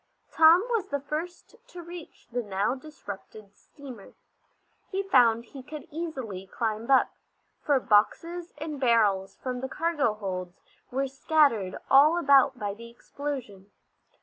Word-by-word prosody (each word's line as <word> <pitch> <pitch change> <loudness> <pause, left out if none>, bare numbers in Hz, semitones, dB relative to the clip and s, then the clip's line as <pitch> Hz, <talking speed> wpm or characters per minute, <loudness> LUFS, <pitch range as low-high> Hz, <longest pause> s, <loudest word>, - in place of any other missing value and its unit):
Tom 325 +5 +6
was 455 -5 0
the 285 - -2
first 325 +9 -6
to 360 -7 -10
reach 340 -1 -11
the 245 +1 -1
now 205 +1 -1
disrupted 215 -7 -10
steamer. 255 -8 -13 0.8
He 390 0 -2
found 235 -10 +4
he 270 +3 -11
could 300 +3 -9
easily 260 - -6
climb 220 +3 -3
up, 265 -2 +4 0.5
for 285 -3 +2
boxes 335 +11 +1
and 300 -1 -6
barrels 210 -6 +2
from 250 -1 -5
the 265 - -4
cargo 300 -10 0
holds 185 -3 -6 0.3
were 270 +2 -1
scattered 270 - +1
all 295 +5 +6
about 275 -4 +4
by 205 -4 -3
the 230 +3 -11
explosion. 235 -6 -7
265 Hz, 135 wpm, -27 LUFS, 215-310 Hz, 0.8 s, Tom